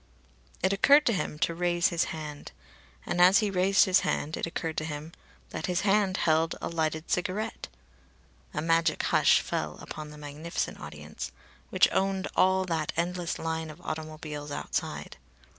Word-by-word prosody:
It 190 +1 +3
occurred 285 +9 +6
to 235 - +3
him 180 -5 -2
to 170 - -4
raise 175 0 +2
his 170 -1 +1
hand. 150 -2 -7 0.5
And 175 - 0
as 185 +3 +8
he 210 -1 +1
raised 190 +1 +4
his 185 -1 +4
hand 155 +2 -1
it - - -2
occurred 165 -1 -4
to - - 0
him 155 0 -5 0.4
that 155 - -4
his 180 0 0
hand 195 -1 +2
held 160 0 +2
a - - -3
lighted 160 -1 -2
cigarette. 185 +4 -2 0.8
A - - -3
magic 165 0 +2
hush - - +4
fell 75 -1 -3
upon 155 -1 -7
the 150 - -11
magnificent 150 +3 -4
audience, 75 -3 -7 0.4
which - - +5
owned 195 0 0
all 190 0 +4
that 160 -4 -1
endless 175 0 -1
line 160 -1 -3
of 155 +2 -10
automobiles 155 -2 -6
outside. 145 - -4
165 Hz, 160 wpm, -28 LUFS, 155-185 Hz, 0.8 s, as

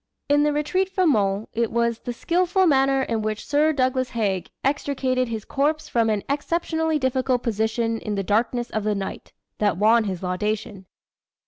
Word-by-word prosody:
In 290 +1 +4
the 295 0 +3
retreat 300 +6 0
from 370 -4 +2
Mons 200 -2 0
it 230 -1 0
was 235 0 0
"the 245 - -5
skilful 360 +8 +1
manner 270 -3 +3
in 230 -3 -1
which 215 0 -3
Sir 300 +2 +3
Douglas 255 -2 0
Haig 200 -6 -1
extricated 265 -2 0
his 225 -2 -5
corps 305 +2 0
from 230 -5 +1
an 210 -2 0
exceptionally 320 +2 0
difficult 260 -2 0
position 225 0 -1
in 210 -1 -4
the 195 - -1
darkness 235 +4 0
of 215 - -2
the 210 0 0
night," 195 -1 -6 0.3
that 205 -5 +1
won 220 +3 +4
his 190 -2 -4
laudation. 200 +1 -3
240 Hz, 170 wpm, -23 LUFS, 215-290 Hz, 0.3 s, In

